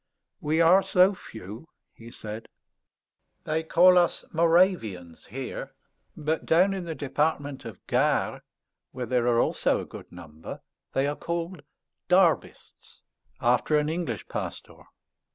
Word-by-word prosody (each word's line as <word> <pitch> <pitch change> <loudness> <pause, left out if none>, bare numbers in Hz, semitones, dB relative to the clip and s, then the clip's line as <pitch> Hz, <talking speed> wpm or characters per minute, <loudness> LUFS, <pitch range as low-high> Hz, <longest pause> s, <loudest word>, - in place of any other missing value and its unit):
"We 155 +2 +1
are 175 +4 +6
so 185 +1 +4
few," 110 - -10 0.3
he 115 0 -13
said. 110 -1 -8 1.0
"They 155 +1 -1
call 180 +3 +6
us 175 - 0
Moravians 165 - +1
here; 130 +4 -6 0.4
but 155 +1 -1
down 185 +4 +3
in 190 -2 -4
the 165 -1 -4
Department 145 -1 -2
of 110 -5 -10
Gard, - - +1 0.5
where 125 - -4
there 125 -1 +1
are 120 -1 +3
also - - +1
a - - -5
good - - -11
number, 80 -3 -10 0.3
they 135 - +1
are 145 +1 -1
called 170 +1 -4 0.5
Derbists, 180 -2 0 0.4
after 125 +5 +3
an 150 0 +1
English 160 - -3
pastor." - - -7
150 Hz, 130 wpm, -27 LUFS, 120-170 Hz, 1.0 s, are